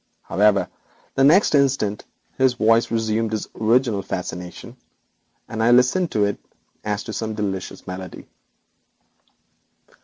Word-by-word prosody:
However, 100 0 +2 0.5
the 135 - +2
next 165 +8 +5
instant 135 -8 +1 0.3
his 130 -1 +2
voice 115 +1 +3
resumed 110 -1 -1
its 105 - -4
original 115 -1 +1
fascination, 90 +4 -6 0.7
and 110 - -4
I 115 - +3
listened 125 +9 +4
to 105 -1 +2
it 100 - -2 0.4
as 105 0 -2
to 110 - -7
some 110 -1 -3
delicious 95 -3 -4
melody. 90 0 -8
110 Hz, 120 wpm, -22 LUFS, 100-125 Hz, 0.7 s, next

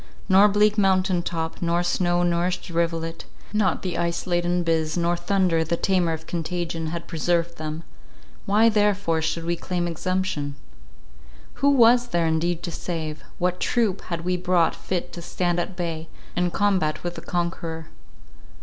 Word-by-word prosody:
Nor 195 +1 +7
bleak 210 +1 +3
mountain 190 -2 +3
top, 165 -1 -4
nor 170 0 +1
snow 175 0 +1
nourished 175 +1 0
rivulet; 165 -1 -1 0.3
not 205 -5 +1
the 185 -2 -2
ice 170 0 -1
laden 175 0 +1
Biz, 160 -1 0
nor 170 0 +1
thunder, 180 -3 +1
the 170 +2 -1
tamer 180 -3 +1
of 160 0 -5
contagion, 170 -1 -3
had 170 +1 -4
preserved 170 +1 0
them— 155 +1 -4 0.6
why 210 +3 +5
therefore 205 -6 +2
should 165 +1 -2
we 170 0 0
claim 175 0 -2
exemption? 170 -4 -2 1.1
Who 280 - +5
was 245 -2 +5
there 170 -7 +1
indeed 165 +1 0
to 170 - -3
save? 160 -3 -4
What 180 0 0
troop 220 -6 +1
had 170 -2 -3
we 180 0 +1
brought 180 -1 +2
fit 175 -1 -4
to 170 - -7
stand 175 0 -1
at 180 +2 -3
bay, 165 -2 -4 0.3
and 180 0 +1
combat 185 -7 +1
with 175 0 -3
the - - -8
conqueror? 165 -2 -3
175 Hz, 160 wpm, -24 LUFS, 165-185 Hz, 1.1 s, Nor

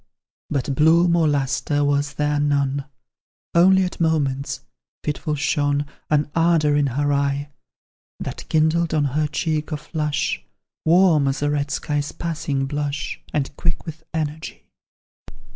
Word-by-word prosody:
But 140 -1 -1
bloom 170 +4 +4
or 165 -2 +3
lustre 145 +1 0
was 145 0 0
there 150 0 +1
none, 140 -1 +1 0.7
Only 190 +2 +6
at 180 - -4
moments, 145 -4 0 0.4
fitful 150 +1 -2
shone 145 0 +1 0.2
An 150 -1 +2
ardour 165 -3 +3
in 145 -1 +3
her 145 +3 0
eye, 140 0 0 0.7
That - - -6
kindled 160 +1 +2
on 150 - +2
her 150 +1 +1
cheek 155 0 -2
a 150 - -1
flush, 150 - -2 0.4
Warm 165 -4 +5
as 135 +1 -1
a 145 - +1
red 145 -1 -1
sky's 145 -1 -2
passing 150 -5 -2
blush 145 +1 -3
And 145 -1 -2
quick 165 -2 -2
with 160 -1 -7
energy. 155 0 -4
150 Hz, 135 wpm, -22 LUFS, 145-160 Hz, 0.7 s, Only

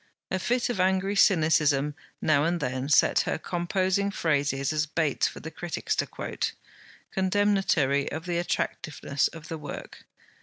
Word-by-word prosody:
A 190 - 0
fit 240 +6 +1
of 235 -6 -2
angry 190 +2 +2
cynicism 155 -6 +3 0.3
now 145 -2 +3
and 170 +2 +1
then 130 -1 -2
set 150 - +5
her - - 0
composing 185 +4 0
phrases 145 -6 0
as 155 0 0
baits 155 -2 +1
for - - -8
the 160 - -7
critics 175 - -3
to - - 0
quote, - - -3 0.6
condemnatory 190 -8 +2
of 160 +3 -5
the 175 -1 -1
attractiveness 150 -4 -1
of 160 -1 -11
the 160 - -5
work. 145 - -8
165 Hz, 150 wpm, -27 LUFS, 145-190 Hz, 0.6 s, set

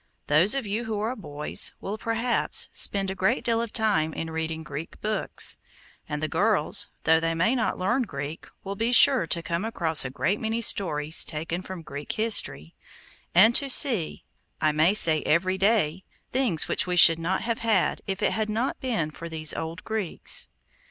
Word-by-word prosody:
Those 170 - +3
of 270 -4 -2
you 215 +4 -3
who 220 -2 -3
are 230 +4 -2
boys 150 - -2
will, 200 - -5
perhaps, 230 +2 0
spend 195 -1 +2
a - - -3
great 190 +7 0
deal 230 -1 +1
of 230 -2 -5
time 205 -9 0
in 165 0 -5
reading 160 0 -4
Greek 150 +2 -8
books; 215 0 -1 0.5
and 150 0 -4
the - - +1
girls, 185 -1 0
though 160 0 +4
they 165 0 -1
may 180 +9 +1
not 245 -4 -1
learn 235 +9 0
Greek, 145 - -6 0.2
will 195 - -5
be 225 +4 -1
sure 250 -6 +5
to 170 +1 -1
come 170 +2 -3
across 170 -9 +1
a 130 - -4
great 190 +9 -1
many 225 +1 -2
stories 160 -8 +3
taken 165 +3 -4
from 185 -2 -9
Greek 145 0 -6
history, 200 - 0 0.6
and 215 +6 +7
to 275 +3 +1
see, 235 - +1 0.4
I 155 - +2
may 160 +6 +2
say 160 -7 +4
every 185 +4 0
day, 190 -4 +1 0.3
things 245 - +1
which - - 0
we 180 - -1
should 165 -1 +7
not 180 +3 -1
have 230 -1 -2
had 225 -5 0
if 190 -1 -3
it - - +2
had 220 -1 -2
not 230 +5 -2
been 220 -12 -2
for 170 +2 -9
these 155 -1 0
old 160 0 -6
Greeks. 215 -6 -1
185 Hz, 185 wpm, -25 LUFS, 160-225 Hz, 0.6 s, and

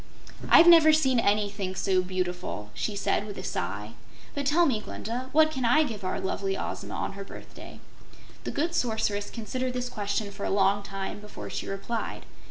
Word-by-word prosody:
"I've 335 - +9
never 330 -2 +8
seen 265 -5 +3
ANYthing 205 -3 0
so 190 -2 +2
beautiful!" 180 - -3
she 210 - -3
said, 200 +1 0
with 205 - -7
a 185 - -6
sigh. 105 - -3 0.4
"But 285 -1 -2
tell 335 +4 +4
me, 250 -8 +1
Glinda, 245 +5 -5
what 310 +1 +5
can 265 -4 -3
I 245 +7 +5
give 215 -8 -5
our 185 - -2
lovely 195 0 -2
Ozma - - -5
on - - -3
her 200 0 -7
birthday?" - - -11 0.6
The - - -3
good 330 +4 -1
Sorceress 220 -6 0
considered 250 +3 -3
this 250 0 -3
question 205 -1 -2
for 200 - -8
a - - -1
long 195 +1 +3
time 195 0 -5
before 210 0 -9
she - - -4
replied. 195 +4 -4
210 Hz, 180 wpm, -27 LUFS, 195-255 Hz, 0.6 s, I've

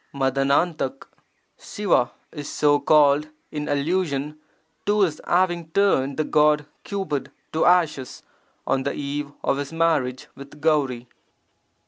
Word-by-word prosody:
[Tf^TRra 140 - +1 0.4
— - - -46
Siva 195 - 0 0.2
is 145 -2 -7
so 145 -1 +3
called 145 0 +4 0.2
in 150 -1 -4
allusion 150 -1 -1 0.5
to 210 0 +3
His 165 -6 +1
having 175 -2 +1
turned 140 -8 +2
the 155 - +1
god 150 -1 +3 0.2
Cupid 155 -10 -3 0.2
to 160 - +2
ashes 160 -7 +1 0.4
on 135 - +1
the 140 - -2
eve 145 0 -4
of 135 - +1
His 140 -1 -4
marriage 155 -6 0
with 140 +2 -13
Gauri. 140 -6 +1
150 Hz, 125 wpm, -23 LUFS, 140-165 Hz, 0.5 s, called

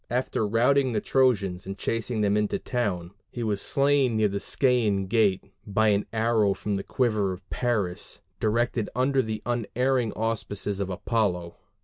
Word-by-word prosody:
After 120 -3 0
routing 125 +4 +3
the 105 - +1
Trojans 100 -9 +1
and 95 0 -5
chasing 115 +1 -2
them 100 -1 +2
into 105 -1 +1
the - - -5
town, 95 -9 -2 0.2
he 120 - -5
was 105 -3 -1
slain 140 -4 +2
near 110 -1 +3
the 100 0 -2
Scæan 110 -7 +1
gate 100 -2 +2 0.2
by 110 +2 +2
an 100 0 +1
arrow 110 -3 +2
from 105 - -3
the 100 0 -2
quiver 110 -7 0
of 90 +1 -12
Paris, 105 -8 -2 0.2
directed 115 0 0
under 130 +2 +2
the 110 -3 -4
unerring 120 0 0
auspices 105 -3 -2
of 100 -1 -2
Apollo. 90 -3 -1
110 Hz, 160 wpm, -26 LUFS, 100-120 Hz, 0.2 s, routing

